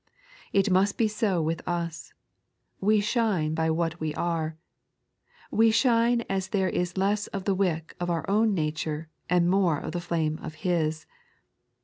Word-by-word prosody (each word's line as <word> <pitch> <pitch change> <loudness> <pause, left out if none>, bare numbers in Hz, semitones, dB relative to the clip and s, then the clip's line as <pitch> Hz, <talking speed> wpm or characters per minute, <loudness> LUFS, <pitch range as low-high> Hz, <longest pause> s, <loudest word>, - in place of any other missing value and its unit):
It 195 0 +2
must 195 +2 +3
be 225 - +3
so 205 -5 0
with 160 +1 -1
us; 170 -4 -3 0.7
we 210 +2 +3
shine 205 -8 +1
by 160 0 0
what 165 +1 -1
we 155 -1 -3
are. 160 -2 -2 0.9
We 225 +1 +5
shine 235 0 +3
as 190 -1 -1
there 190 -3 0
is 180 +1 -2
less 200 +2 +1
of 195 -2 -5
the 200 - +2
wick 175 -4 -1
of 175 0 -2
ottr 170 -2 -1
own 210 +1 +3
nature, 155 -1 -2 0.2
and 175 -1 +3
more 180 -4 +3
of - - -5
the 175 - -3
flame 160 -3 -1
of 155 - -7
ffis. 160 -2 -1
175 Hz, 160 wpm, -27 LUFS, 160-200 Hz, 0.9 s, We